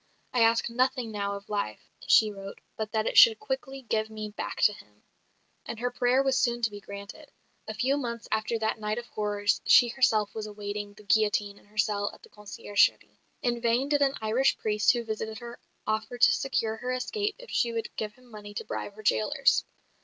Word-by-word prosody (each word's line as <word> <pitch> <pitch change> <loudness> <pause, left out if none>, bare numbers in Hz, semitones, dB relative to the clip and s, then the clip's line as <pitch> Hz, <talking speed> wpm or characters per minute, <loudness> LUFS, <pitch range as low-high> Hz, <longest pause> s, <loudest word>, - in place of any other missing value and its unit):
"I 245 - +2
ask 230 0 +4
nothing 250 0 0
now 200 -1 -2
of 200 +1 -10
life," 200 - -4 0.2
she 215 -1 +6
wrote, 195 -1 -9 0.2
"but 215 -1 -4
that 220 -1 0
it - - +5
should 225 -2 +8
quickly 265 +2 -5
give 220 -2 -1
me 215 -1 -6
back 205 - -5
to 210 - +6
him." 105 - -17 0.6
And - - -6
her 245 +1 -1
prayer 245 +2 +2
was 270 -1 +2
soon 240 -1 0
to 225 - +2
be 205 - -8
granted. 200 +10 -10 0.4
A 220 - -5
few 260 +6 +1
months 235 -4 -4
after 220 +1 0
that 220 0 -1
night 210 +1 -2
of 240 - -5
horrors 205 -2 -1
she 240 - +7
herself 220 -5 +2
was 215 -1 -5
awaiting 205 0 -6
the 210 - -15
guillotine 205 -1 +1
in - - -24
her 210 +1 -23
cell 205 -1 +1
at - - -21
the - - -15
conciergerie. 205 0 0 0.2
In 240 -1 0
vain 240 +4 +1
did 290 -1 +2
an 275 -1 +3
Irish 230 +5 +2
priest 210 -1 +3
who 240 -1 -2
visited 220 0 -4
her 235 +1 -9 0.3
offer 215 +2 -2
to 245 0 +6
secure 225 -5 -1
her 250 +3 -4
escape 410 +12 -2
if - - -12
she 235 - +1
would 230 -1 -4
give 215 -1 -4
him 255 - -21
money 210 -3 -11
to - - -4
bribe 205 - -5
her 215 - -12
jailers. 110 - +2
220 Hz, 210 wpm, -28 LUFS, 210-245 Hz, 0.6 s, should